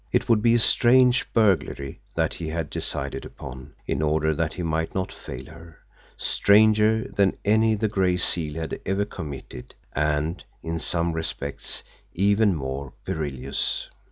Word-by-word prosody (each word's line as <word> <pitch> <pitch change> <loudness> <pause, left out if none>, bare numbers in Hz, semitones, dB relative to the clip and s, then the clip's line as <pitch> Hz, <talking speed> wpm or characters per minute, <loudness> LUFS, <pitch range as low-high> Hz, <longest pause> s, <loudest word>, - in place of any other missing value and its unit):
It - - +1
would 115 -3 +4
be 115 +1 +4
a - - +4
strange 125 +2 +4
burglary 95 -10 +1
that - - +1
he 85 - -5
had 80 -1 -3
decided - - -3
upon, 65 -1 -10
in - - -1
order 80 0 +2
that 80 +1 -1
he 90 - -4
might 80 0 -1
not 95 -1 -1
fail 65 0 -8
her 80 +1 -13 0.4
stranger 110 +1 +4
than 100 -2 +3
any 110 +1 +4
the 110 +1 0
Gray 95 -3 +1
Seal 80 -4 0
had 80 -1 -4
ever 95 +1 0
committed, 70 -9 -8 0.2
and, 75 +3 0 0.2
in 80 0 -2
some 85 0 -1
respects, 70 -3 -4 0.3
even 100 +1 +3
more 70 -1 -4
perilous! 70 -3 -3
85 Hz, 150 wpm, -25 LUFS, 75-105 Hz, 0.4 s, would